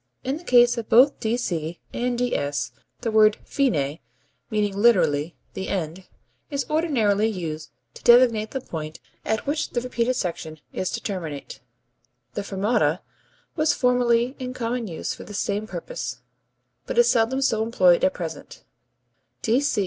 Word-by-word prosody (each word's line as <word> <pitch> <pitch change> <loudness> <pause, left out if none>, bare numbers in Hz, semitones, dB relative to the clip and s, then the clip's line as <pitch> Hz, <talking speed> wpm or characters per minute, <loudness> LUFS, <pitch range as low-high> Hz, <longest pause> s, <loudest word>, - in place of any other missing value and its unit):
In 265 +3 -1
the 330 - -13
case 240 -4 +5
of 225 - -7
both 260 +5 +6
D.C. 175 -8 -2
and 245 0 -1
D.S. 145 -13 -1 0.3
the 230 -2 -1
word 215 -1 +5
fine 155 - 0 0.5
(meaning 205 -2 0
literally 170 -8 +3 0.2
the 190 - -4
end) 180 0 -3 0.4
is 280 -2 -2
ordinarily 230 -10 +2
used 160 -7 -4 0.2
to - - -13
designate 235 -3 +5
the 265 - -4
point 155 -6 -6 0.2
at 220 0 -1
which 295 +2 -1
the 240 - -1
repeated 250 0 -1
section 160 -6 -4
is 185 - -2
to - - -4
terminate. 165 -8 -5 0.7
The - - -2
fermata - - -9
([fermata 200 -5 +1
symbol]) 180 - -14 0.5
was 310 0 +3
formerly 245 0 +2
in 255 -1 -5
common 235 -1 -2
use 165 -4 -4
for - - -10
this 205 - -7
same 205 +1 -1
purpose, 170 - -5 0.7
but - - -4
is 240 0 +6
seldom 245 +2 +2
so 220 -4 +2
employed 185 -6 +4
at 280 0 +3
present. - - -7
220 Hz, 150 wpm, -24 LUFS, 180-245 Hz, 0.7 s, both